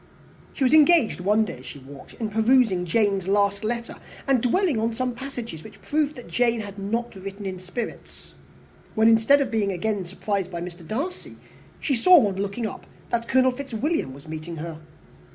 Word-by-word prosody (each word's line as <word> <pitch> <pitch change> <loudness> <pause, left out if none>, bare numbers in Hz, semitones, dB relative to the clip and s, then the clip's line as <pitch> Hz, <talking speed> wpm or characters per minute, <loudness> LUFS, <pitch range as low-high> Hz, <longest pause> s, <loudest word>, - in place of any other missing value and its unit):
She 280 - -2
was 255 - +3
engaged 310 - +5
one 210 +4 +3
day, 170 - -7
as 130 - -14
she - - -8
walked, 135 0 -13
in 220 -2 -3
re - - -14
perusing 220 -5 +3
Jane's 195 0 +1
last 200 +1 +2
letter, 235 +2 -3 0.3
and 270 -4 +3
dwelling 295 - +2
on 225 +1 -1
some 255 +1 -1
passages 235 - -7
which - - -13
proved 300 0 0
that 245 - -10
Jane 235 -2 +1
had 200 -1 -8
not 230 +5 -2
written 195 +1 -8
in 185 -1 -4
spirits, 185 +6 -7 0.6
when, 220 0 +4
instead 225 +6 +5
of 260 -3 -1
being 210 -3 +1
again 200 +2 -1
surprised 190 +1 -3
by 170 -2 -5
Mr. 175 -1 -8
Darcy, 290 +12 -4 0.4
she 285 - 0
saw, 305 +2 +6
on 195 -1 -3
looking 200 +4 -2
up, 215 - -7 0.2
that 235 0 0
Colonel 260 0 +4
Fitzwilliam 270 - -2
was 140 +4 -13
meeting 160 +2 -6
her. 160 0 -6
220 Hz, 190 wpm, -24 LUFS, 190-250 Hz, 0.6 s, saw